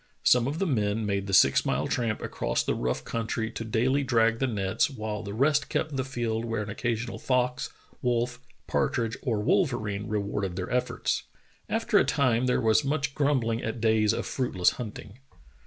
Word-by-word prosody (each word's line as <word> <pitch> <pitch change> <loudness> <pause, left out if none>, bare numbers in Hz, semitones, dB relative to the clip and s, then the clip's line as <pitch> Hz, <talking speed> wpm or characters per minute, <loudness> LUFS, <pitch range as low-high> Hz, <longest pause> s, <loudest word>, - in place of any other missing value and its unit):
Some 125 0 +5
of 145 +3 -2
the 195 - 0
men 110 - 0
made 100 -1 -1
the - - -3
six 70 -7 +6
mile - - 0
tramp 115 -3 -1
across - - -1
the - - 0
rough 60 +1 -2
countr}^ 115 0 -2
to - - -4
daily 125 +5 +1
drag 115 -3 +2
the 135 - +1
nets, 100 +5 0
while 110 -5 -4
the 100 - -6
rest 140 +3 +2
kept 155 -3 -1
the 130 - 0
field 120 -4 -2
where 115 -2 -2
an 105 - -6
occasional 115 +1 -3
fox, 125 -1 0 0.3
wolf, 120 0 0 0.3
partridge, 115 -2 0
or 110 -4 -1
wolverine 110 - 0
rewarded 100 -3 -2
their 90 +2 -4
efforts. 125 0 -1 0.4
After - - +2
a - - +4
time 125 -2 +2
there 125 - +2
was 115 +3 +3
much 140 -1 -1
grumbling 130 -6 +1
at 110 +1 -3
days 110 -2 +3
of - - -2
fruitless 95 -9 +1
hunting. 105 0 -8
115 Hz, 180 wpm, -27 LUFS, 105-130 Hz, 0.4 s, six